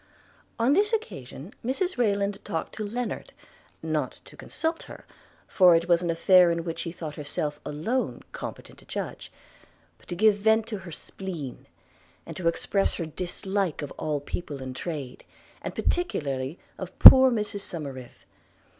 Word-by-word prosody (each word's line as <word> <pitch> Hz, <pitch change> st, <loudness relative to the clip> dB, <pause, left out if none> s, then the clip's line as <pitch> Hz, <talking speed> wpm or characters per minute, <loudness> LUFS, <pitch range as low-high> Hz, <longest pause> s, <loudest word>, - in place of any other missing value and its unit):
On 235 Hz, +4 st, +3 dB
this 420 Hz, +6 st, +2 dB
occasion 165 Hz, -, -5 dB
Mrs 355 Hz, +10 st, -1 dB
Rayland 200 Hz, -3 st, 0 dB
talked 160 Hz, -, -4 dB
to 215 Hz, -, -5 dB
Lennard 235 Hz, +4 st, -4 dB, 0.3 s
– -, -, -33 dB, 0.2 s
not -, -, -6 dB
to -, -, -14 dB
consult 325 Hz, 0 st, -3 dB
her, -, -, -11 dB, 0.4 s
for 180 Hz, -3 st, +6 dB
it 165 Hz, +1 st, +1 dB
was 170 Hz, -1 st, +4 dB
an 175 Hz, -, -2 dB
affair 180 Hz, +2 st, +5 dB
in 170 Hz, 0 st, -1 dB
which 165 Hz, -1 st, -5 dB
she 170 Hz, -, -3 dB
thought 160 Hz, -3 st, -7 dB
herself 150 Hz, 0 st, -2 dB
alone 170 Hz, -, -2 dB
competent -, -, -8 dB
to -, -, -19 dB
judge -, -, -6 dB, 0.3 s
– -, -, -35 dB
but -, -, -24 dB
to 175 Hz, -, -4 dB
give 215 Hz, +3 st, +5 dB
vent 220 Hz, +2 st, +3 dB
to 215 Hz, -3 st, -5 dB
her 175 Hz, -2 st, -10 dB
spleen, 160 Hz, -5 st, -7 dB, 0.6 s
and -, -, -8 dB
to 180 Hz, -3 st, -2 dB
express 195 Hz, +4 st, +1 dB
her 170 Hz, -, -3 dB
dislike 180 Hz, +1 st, -3 dB
of 145 Hz, -, -6 dB
all 150 Hz, -2 st, -2 dB
people 145 Hz, 0 st, -6 dB
in 130 Hz, -1 st, -6 dB
trade, 140 Hz, -2 st, -6 dB, 0.4 s
and -, -, -6 dB
particularly 140 Hz, -, -1 dB, 0.2 s
of 185 Hz, -1 st, -7 dB
poor 260 Hz, 0 st, +11 dB
Mrs 210 Hz, -3 st, -2 dB
Somerive. 140 Hz, -9 st, -7 dB
180 Hz, 165 wpm, -26 LUFS, 150-215 Hz, 0.6 s, poor